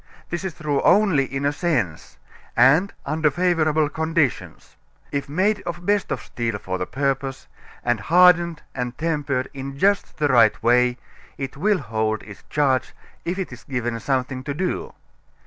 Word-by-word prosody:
This 175 +1 -3
is 185 -4 -4
true 150 -3 -1
only 190 -9 +4
in 135 +1 -4
a 145 - +2
sense 130 - -2 0.4
and 150 +11 +5
under 155 0 +1
favorable 155 -2 +2
conditions. 160 -3 -2 0.4
If 140 0 -3
made 200 +7 +1
of 170 - -4
the 175 - -14
best 205 +2 +1
of - - -2
steel 115 -3 -3
for 95 -2 -4
the 90 - -2
purpose 135 -1 -2 0.4
and 120 -2 +1
hardened 170 - +4
and 125 -1 -4
tempered 145 -5 -1
in 135 0 -6
just 200 +5 +1
the 150 - +2
right 115 -4 +5
way, 125 +1 +3 0.4
it 135 -1 -5
will 200 +7 +2
hold 110 - -2
its 105 -2 -11
charge 135 -3 +1 0.3
if 175 +2 -2
it 190 -9 -4
is 125 - -12
given 120 -3 -3
something 130 0 -2
to 140 -1 -3
do. 180 +3 -3
140 Hz, 165 wpm, -23 LUFS, 125-170 Hz, 0.4 s, and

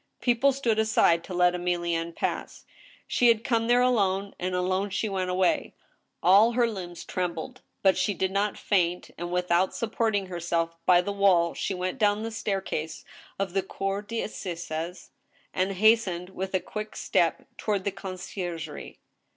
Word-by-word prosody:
People 245 +3 +3
stood 240 -5 0
aside 175 -6 +3
to 185 - -7
let 180 0 +4
Emilienne 170 -2 -1
pass. - - -3 0.4
She 245 - +2
had 230 -1 +4
come 230 -2 +1
there 245 +1 +4
alonS, 200 -5 +1
and 180 0 -2
alone 185 +2 0
she 200 +3 -1
went 190 -2 -2
away. 180 0 +1 0.5
All 205 +6 +6
her 240 0 +3
limbs 180 -6 -6
trembled, 180 +8 -4 0.2
but 190 -1 +4
she 205 - +1
did 190 +2 0
not 200 +1 0
faint, 180 -3 0
and 175 +1 -5
without 180 +1 +1
supporting 220 -3 0
herself 170 -2 -2
by 175 -1 +6
the 200 - -3
wall 185 -4 +3
she 195 - -2
went 185 +7 -3
down 210 0 +2
the 225 - -4
staircase 195 -7 -3 0.3
of 195 -2 -2
the 195 - +2
cour 195 +1 -3
cTassizes, 180 -6 -5 0.4
and 190 +1 0
hastened 195 -3 +3
with 190 0 -4
a - - +3
quick 215 +3 -6
step - - 0
toward 205 -3 -1
the 200 - -1
conciergirie. 180 -4 -6
190 Hz, 160 wpm, -27 LUFS, 175-215 Hz, 0.5 s, All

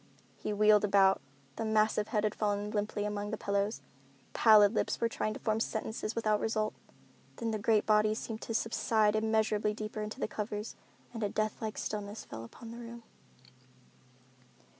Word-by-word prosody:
He - - -4
wheeled 210 0 +5
about. 195 -1 +4 0.4
The - - -2
massive 215 -1 +2
head 210 -1 0
had 215 -1 +1
fallen 205 0 -1
limply 205 0 -1
among 205 0 -3
the 215 - -3
pillows. 200 +2 -1 0.5
Pallid 215 -2 +6
lips - - 0
were 230 - +2
trying 215 -1 -2
to - - -7
form 220 0 0
sentences 220 -1 -3
without 215 -2 +1
result. 215 -1 -1 0.6
Then 230 -1 -2
the 215 - -2
great 215 0 +2
body 215 0 +3
seemed 220 0 -5
to 225 - -4
subside 220 -1 +2
immeasurably 215 -1 +1
deeper 215 0 -5
into 210 +1 -5
the - - -1
covers 210 0 -4 0.4
and 230 - -5
a 205 - 0
death 215 +1 -2
like 220 -1 -4
stillness 210 0 -4
fell 110 +1 -8
upon 225 - -11
the 235 - -8
room. 235 0 -9
215 Hz, 170 wpm, -32 LUFS, 210-220 Hz, 0.6 s, Pallid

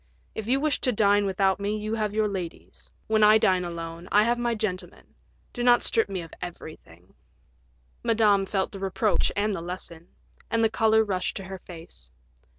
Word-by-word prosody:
If 220 -1 -6
you 265 +3 +2
wish 300 0 0
to 255 - +2
dine 205 -2 +3
without 195 0 +1
me 205 +1 -1
you 215 +1 -4
have 215 -2 -1
your 215 0 +1
ladies. 185 -5 -7
When 220 0 +1
I 215 +1 +7
dine 190 -5 +2
alone 170 0 -7
I 210 - +5
have 240 +2 +1
my 240 -1 0
gentlemen; 200 -4 -5 0.4
do 245 - -5
not 240 0 +5
strip 225 -2 +2
me 190 -3 -4
of 165 - -13
everything." 155 - -10 0.9
Madame 215 -4 +3
felt 190 -1 -1
the 195 - -8
reproach 195 +2 0
and 205 0 0
the 170 - -5
lesson, 170 -1 -7 0.4
and 230 0 +1
the 220 - +3
color 220 0 +3
rushed 190 -4 -2
to 195 - -6
her 190 0 -8
face. 160 - -11
200 Hz, 185 wpm, -26 LUFS, 180-220 Hz, 0.9 s, I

